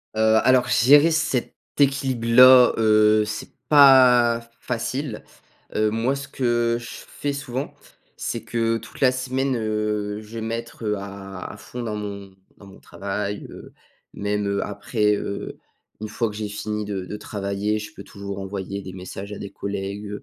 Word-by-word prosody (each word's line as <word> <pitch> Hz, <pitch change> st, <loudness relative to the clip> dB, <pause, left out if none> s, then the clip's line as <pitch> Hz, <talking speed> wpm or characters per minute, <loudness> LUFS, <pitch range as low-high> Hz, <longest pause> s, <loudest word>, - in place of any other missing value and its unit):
Heu, 110 Hz, 0 st, +4 dB
alors, 130 Hz, -1 st, +4 dB
gérer 145 Hz, +6 st, +6 dB
cet 145 Hz, -5 st, -1 dB, 0.2 s
équilibre 135 Hz, -4 st, +1 dB
là, 125 Hz, +1 st, +8 dB
heu, 110 Hz, -1 st, +4 dB
c'est 105 Hz, 0 st, -6 dB, 0.2 s
pas 125 Hz, -5 st, +6 dB
facile. 125 Hz, 0 st, -4 dB, 0.5 s
Heu, 110 Hz, 0 st, +2 dB
moi 115 Hz, +5 st, 0 dB
ce 140 Hz, 0 st, -7 dB
que 120 Hz, -2 st, 0 dB
je 120 Hz, -, -10 dB, 0.2 s
fais 145 Hz, -1 st, -4 dB
souvent, 140 Hz, -1 st, -5 dB, 0.4 s
c'est 115 Hz, -2 st, -4 dB
que, 115 Hz, 0 st, 0 dB
toute 115 Hz, +1 st, -12 dB
la 130 Hz, -2 st, +5 dB
semaine, 130 Hz, +1 st, -1 dB
heu, 105 Hz, -2 st, -2 dB
je 110 Hz, +1 st, -12 dB
vais -, -, -6 dB
mettre, 115 Hz, +1 st, -5 dB
heu, 105 Hz, 0 st, +1 dB
à 95 Hz, -1 st, -8 dB
à -, -, -11 dB
fond 125 Hz, 0 st, -8 dB
dans 110 Hz, -2 st, -3 dB
mon 100 Hz, -2 st, -7 dB, 0.2 s
dans 100 Hz, -, -15 dB
mon 95 Hz, 0 st, -15 dB
travail. 100 Hz, +1 st, -5 dB
Heu, -, -, -12 dB, 0.4 s
même, 105 Hz, 0 st, -1 dB
heu, 100 Hz, 0 st, 0 dB
après, 105 Hz, +1 st, 0 dB
heu, 100 Hz, 0 st, -5 dB, 0.4 s
une 110 Hz, -, -4 dB
fois 115 Hz, +1 st, -1 dB
que 105 Hz, -, -9 dB
j'ai 105 Hz, -1 st, -4 dB
fini 105 Hz, +1 st, -4 dB
de 95 Hz, -3 st, -4 dB
de 105 Hz, -, -6 dB
travailler, 105 Hz, 0 st, -2 dB
je 105 Hz, 0 st, -7 dB
peux 100 Hz, -, -10 dB
toujours 100 Hz, -1 st, -7 dB
envoyer 100 Hz, 0 st, -5 dB
des 95 Hz, -1 st, -9 dB
messages 95 Hz, +2 st, -8 dB
à 105 Hz, -, -6 dB
des 100 Hz, -, -8 dB
collègues 100 Hz, +1 st, -5 dB
110 Hz, 170 wpm, -23 LUFS, 100-120 Hz, 0.5 s, là